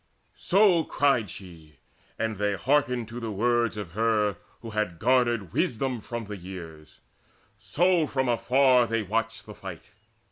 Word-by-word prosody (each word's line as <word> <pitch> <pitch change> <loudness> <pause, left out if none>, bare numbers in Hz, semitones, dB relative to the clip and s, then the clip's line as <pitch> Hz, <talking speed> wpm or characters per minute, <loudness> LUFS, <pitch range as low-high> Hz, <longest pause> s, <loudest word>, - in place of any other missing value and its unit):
So 190 -3 +4
cried 135 -10 +1
she, 80 -5 -12 0.4
and 110 -2 -2
they 105 0 0
hearkened 125 -1 +1
to 120 +2 -6
the 115 -2 -4
words 115 +2 +1
Of 100 -6 -6
her 105 -1 +1 0.3
who 115 - -7
had 105 -5 -2
garnered 120 -5 +1
wisdom 125 +1 -1
from 120 +1 -6
the 105 0 -7
years; 85 -4 -10 0.6
So 175 -1 +2
from 130 -2 -1
afar 125 +1 +3
they 115 -1 -1
watched 115 +3 -2
the 105 - -10
fight. 90 -7 -10
115 Hz, 145 wpm, -26 LUFS, 100-125 Hz, 0.6 s, So